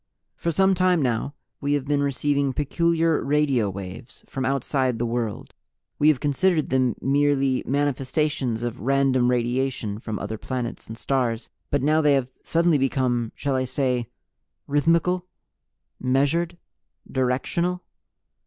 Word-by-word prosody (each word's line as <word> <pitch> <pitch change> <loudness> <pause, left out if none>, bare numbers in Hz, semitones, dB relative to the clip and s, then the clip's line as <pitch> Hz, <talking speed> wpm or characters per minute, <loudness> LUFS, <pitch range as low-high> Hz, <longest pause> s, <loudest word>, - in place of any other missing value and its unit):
"For 170 - -1
some 190 +4 +3
time 185 -1 +3
now 125 +3 -1 0.2
We 145 0 0
have 145 -2 0
been 145 0 +1
receiving 140 0 0
peculiar 165 +3 +1
radio 140 -7 +2
waves 95 +4 -8
from 130 -1 -4
outside 130 -1 0
the 120 - -1
world. 115 -2 -3 0.5
We 150 - +4
have 155 -4 +4
considered 155 +3 +1
them 130 -3 +2
merely 140 -1 +2
manifestations 135 -3 0
of 120 +1 -3
random 130 -1 +2
radiation 120 -3 -1
from 110 -2 -4
other 110 -1 -5
planets 125 -3 -4
and 110 - -8
stars. 125 -3 -1 0.2
But 145 -2 0
now 155 +2 +3
they 145 -2 +4
have 130 -2 0
suddenly 165 -2 +2
become 125 -3 0
shall 140 -2 -1
I 130 0 +1
say 125 -2 -1 0.6
rhythmical? 170 +5 +1 0.7
Measured? 145 +7 +1 0.5
Directional? 140 +8 0
135 Hz, 135 wpm, -24 LUFS, 125-150 Hz, 0.7 s, We